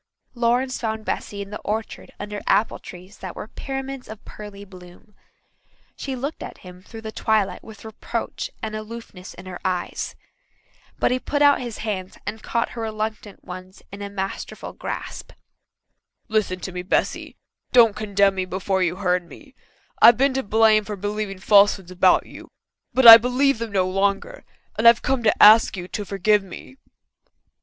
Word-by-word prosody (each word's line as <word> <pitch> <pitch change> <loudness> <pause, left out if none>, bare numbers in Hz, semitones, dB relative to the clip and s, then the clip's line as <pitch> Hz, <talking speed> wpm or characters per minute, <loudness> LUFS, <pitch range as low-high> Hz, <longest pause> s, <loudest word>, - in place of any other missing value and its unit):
Lawrence 245 +2 0
found 220 -1 -3
Bessy 200 -1 -4
in 200 - -14
the 210 - -6
orchard 220 +1 -5
under 205 0 -6
apple 220 - +2
trees 185 +2 -13
that 185 -2 -7
were - - -7
pyramids 270 -1 -6
of 220 -1 -11
pearly 205 -1 -10
bloom. 180 +2 -16 0.8
She 270 -1 -5
looked 280 +5 -5
at - - -8
him 180 0 -12
through 225 +3 -11
the 220 0 -7
twilight 215 -3 0
with 220 -1 -13
reproach 220 -1 -5
and 215 -1 -4
aloofness 215 -4 -9
in 180 - -12
her 185 -1 -8
eyes. 185 -2 -3 0.8
But - - +1
he 255 - +1
put 290 +3 0
out 285 -2 +5
his 240 -3 -6
hands 190 -3 -4
and 215 +1 -5
caught 235 - -1
her 235 - -7
reluctant 215 -2 -5
ones 185 +1 -10
in 200 +1 -9
a 200 - -5
masterful 195 -1 -6
grasp. - - -7 0.9
"Listen 215 -4 0
to 190 - -5
me, 180 0 -5
Bessy. 180 - -2 0.3
Don't 230 -4 +6
condemn 200 -2 +2
me 190 -1 -2
before 190 +1 -2
you've 180 0 0
heard 180 -2 0
me. 285 -4 -15 0.5
I've 235 - +8
been 270 +1 +2
to 265 - 0
blame 220 -1 +3
for 210 0 -6
believing 205 0 -4
falsehoods 200 -2 +3
about 185 0 +3
you, - - -13 0.4
but 260 -1 +2
I 225 -1 +14
believe 250 +2 +1
them 230 -2 -4
no 190 -2 +1
longer, 200 - -1 0.3
and 230 - +5
I've 235 0 +6
come 265 -2 0
to 220 -2 +3
ask 215 -1 +7
you 180 0 -6
to 205 - -4
forgive 205 +2 +2
me." 195 +7 -12
210 Hz, 170 wpm, -22 LUFS, 190-230 Hz, 0.9 s, I